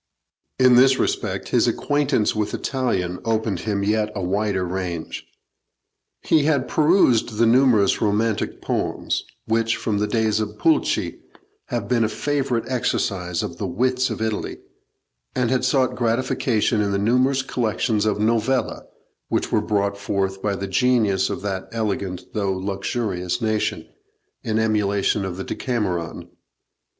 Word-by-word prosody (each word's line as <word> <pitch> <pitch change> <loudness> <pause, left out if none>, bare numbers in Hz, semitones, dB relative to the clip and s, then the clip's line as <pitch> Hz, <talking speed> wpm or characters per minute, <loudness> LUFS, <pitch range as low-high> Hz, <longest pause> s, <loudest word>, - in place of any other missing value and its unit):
In 130 -1 +6
this 130 +1 +6
respect - - -2
his - - +3
acquaintance 145 -7 +1
with 105 -1 -1
Italian 95 -10 -1
opened 110 -4 0
him 100 -1 -2
yet 105 +1 +1
a 95 - -3
wider 95 0 0
range. 90 -2 -4 1.0
He 150 -2 +3
had 145 -4 +1
perused 150 - +3
the 115 - +4
numerous 115 -4 +4
romantic 110 0 0
poems, - - -1 0.2
which, 115 0 +1
from 105 -3 -1
the 105 - 0
days 110 0 +1
of 105 0 -4
Pulci, 160 +7 +1 0.5
have - - -3
been 120 0 +2
a 110 - +1
favourite 135 -2 -1
exercise 95 -8 -1
of - - -5
the - - -2
wits 130 +3 +1
of 110 -1 -3
Italy, 110 -2 -3 0.8
and 125 -2 +1
had 130 - +1
sought 130 -1 +2
gratification 115 -2 +1
in 100 -1 0
the 100 - +1
numerous 125 +6 +2
collections 110 -3 0
of 105 -1 0
novelle, 115 +3 0 0.4
which - - -1
were - - +3
brought 100 -1 -1
forth 95 -1 -2
by 100 -1 0
the 100 - -4
genius 105 -2 +2
of - - -4
that 95 -2 -3
elegant 100 -5 -3
though 100 -3 0
luxurious 95 0 -2
nation, 110 -2 -1 0.5
in 110 -1 -1
emulation 105 -2 +1
of 95 -2 -4
the 95 - -4
'Decameron.' 95 -11 -3
110 Hz, 140 wpm, -22 LUFS, 100-125 Hz, 1.0 s, In